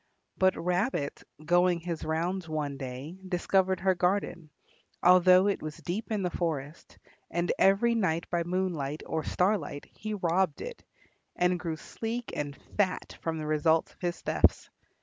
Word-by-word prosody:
But 190 0 +3
Rabbit, 180 - -1 0.2
going 175 +1 +4
his 170 -2 -4
rounds 165 +3 -2
one 150 -3 -2
day, 135 +5 -6
discovered 190 0 +1
her 190 0 +3
garden, 180 -2 -1 0.5
although 185 +1 +7
it 200 -1 +1
was 155 -1 -6
deep 205 +6 -4
in 210 -3 0
the 180 - -1
forest, 155 -3 -4 0.3
and 175 +1 0
every 195 +5 +4
night 170 -7 0
by 175 -1 +1
moonlight 170 -5 -2
or 160 -1 -2
starlight 180 -7 0
he 215 -1 -4
robbed 180 -3 +1
it, 485 -1 -7 0.5
and 180 0 +2
grew 165 -3 -3
sleek 230 +8 -5
and 145 -1 -3 0.2
fat 190 -3 0
from 165 -1 -2
the 155 - -4
results 160 +1 +2
of - - -32
his 175 -1 -2
thefts. - - +2
175 Hz, 150 wpm, -29 LUFS, 160-190 Hz, 0.5 s, although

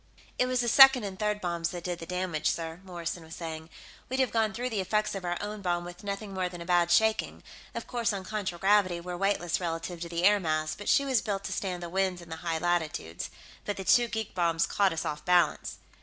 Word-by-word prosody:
"It 250 - +3
was 255 -1 +1
the 240 - -1
second 270 0 +8
and 195 -2 -6
third 210 0 0
bombs 170 -1 -1
that 175 -1 -6
did 175 -1 -3
the 165 - -8
damage, 180 -4 -1
sir," 165 +1 -4
Morrison 175 -2 -5
was 160 +1 -10
saying. 160 -1 -6 0.4
"We'd 260 +1 -1
have 260 -4 +2
gone 220 -2 +2
through 245 +3 -3
the 215 - -1
effects 210 +3 0
of 195 -2 -5
our 175 0 -1
own 210 0 -5
bomb 175 -2 -1
with 175 +2 -10
nothing 200 0 -4
more 185 -1 -1
than 175 -1 -9
a 170 - -7
bad 175 -1 +3
shaking 220 +4 +2 0.3
of - - -4
course, 235 -2 0
on 195 -2 -4
contragravity, 190 -2 +1
we're 180 +1 -5
weightless 175 -3 0
relative 165 0 -4
to 170 - -4
the 170 0 -2
air 205 +2 +6
mass, 155 -3 -1
but 205 - -5
she 280 - +4
was 260 -5 +2
built 200 -3 -3
to - - -3
stand 180 -3 -3
the - - -4
winds 190 0 0
in 170 -1 -13
the 160 - -5
high 165 -1 -2
latitudes. 160 - -2 0.3
But 205 - -3
the 190 - -4
two 240 +5 +5
geek 220 -2 -4
bombs 170 -2 +2
caught 200 -2 +2
us 165 - -3
off 150 0 -4
balance...." 180 -1 +2
180 Hz, 240 wpm, -29 LUFS, 170-210 Hz, 0.4 s, second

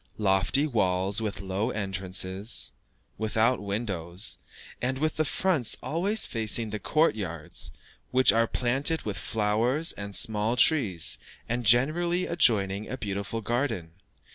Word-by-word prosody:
Lofty 100 +7 +2
walls 100 -5 0
with 105 -2 -4
low 95 +2 -2
entrances, 95 +1 -2 0.5
without 110 +3 +1
windows, 100 -3 -2 0.4
and 130 +1 -1
with 155 +2 -1
the 155 - +1
fronts 160 - +1
always 195 +7 0
facing 110 -1 -1
the 105 - -4
court 155 +4 +2
yards, 85 -7 -4 0.4
which 130 -4 +4
are 115 +1 +3
planted 135 +8 0
with 100 -4 -4
flowers 115 - +1
and 100 -1 -4
small 110 +2 +3
trees, 115 - +3 0.3
and 120 -1 -2
generally 170 +10 +3
adjoining 105 - +2
a 130 - -4
beautiful 100 +1 -4
garden. 115 - -2
110 Hz, 125 wpm, -27 LUFS, 100-130 Hz, 0.5 s, which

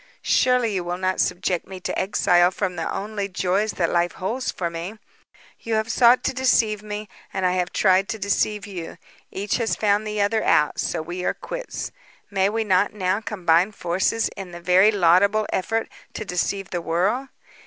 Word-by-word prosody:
Surely, 250 -4 +2
you 185 -2 -1
will 175 +1 -3
not 185 0 -1
subject 180 -1 -1
me 190 -1 -8
to - - -4
exile 175 -2 +3
from 185 -1 -3
the 165 - -3
only 205 0 -3
joys 190 +3 0
that 170 -2 0
life 175 0 +1
holds 230 +8 -3
for 175 - -2
me. 170 +6 -6 0.6
You 225 -1 -2
have 220 +1 0
sought 245 +1 +5
to 265 - 0
deceive 230 -5 +2
me, 210 0 -6 0.2
and 190 - -2
I 180 - +3
have 180 -1 -1
tried 190 +1 +3
to 225 - -2
deceive 205 +1 0
you. 180 -5 -7 0.3
Each 200 +1 -2
has 230 -2 0
found 210 0 +1
the 210 0 -3
other 215 +2 +1
out, 150 - +2
so 155 - -1
we 175 +3 -5
are - - 0
quits. - - -6 0.4
May 195 -1 +2
we 225 +1 -1
not 200 0 +2
now 190 0 0
combine 185 -2 +1
forces 190 +5 0
in 195 -3 -9
the 175 - -7
very 180 +4 +5
laudible 200 +3 +4
effort 225 +4 -1 0.3
to 215 - -4
deceive 195 +1 -2
the 175 - -2
world? 195 +12 0
195 Hz, 185 wpm, -23 LUFS, 180-215 Hz, 0.6 s, sought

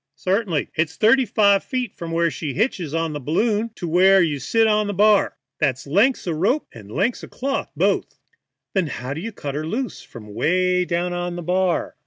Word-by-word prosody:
"Certainly. 185 -5 -1
It's 160 0 -1
thirty 240 +8 +4
five 200 -2 +3
feet 255 -3 -3
from 170 - -7
where 170 0 +1
she 150 -4 -5
hitches 190 - -1
on 165 0 -1
t' - - -6
the 145 - -4
balloon 210 - 0
to 175 - -5
where 190 +4 +5
you 155 -5 +1
sit 225 +10 +2
on 215 -1 +2
the 205 - -3
bar. 210 +1 +3 0.2
That's 135 -4 0
length 200 - +2
o' - - 0
ropes 195 - +1
and 105 -3 -12
length 235 - -1
o' - - -7
cloth 275 +1 -3
both." - - 0 0.6
"Then, 190 -5 +1
how 130 -1 -5
can 160 - -6
you 230 +4 -5
cut 145 -8 -6
her 150 +2 -3
loose 245 +8 -3
from 105 -4 -12
'way 180 - +1
down 175 +1 -1
on 175 0 -3
the 175 - -6
bar?" 180 +1 0
180 Hz, 210 wpm, -22 LUFS, 160-210 Hz, 0.6 s, where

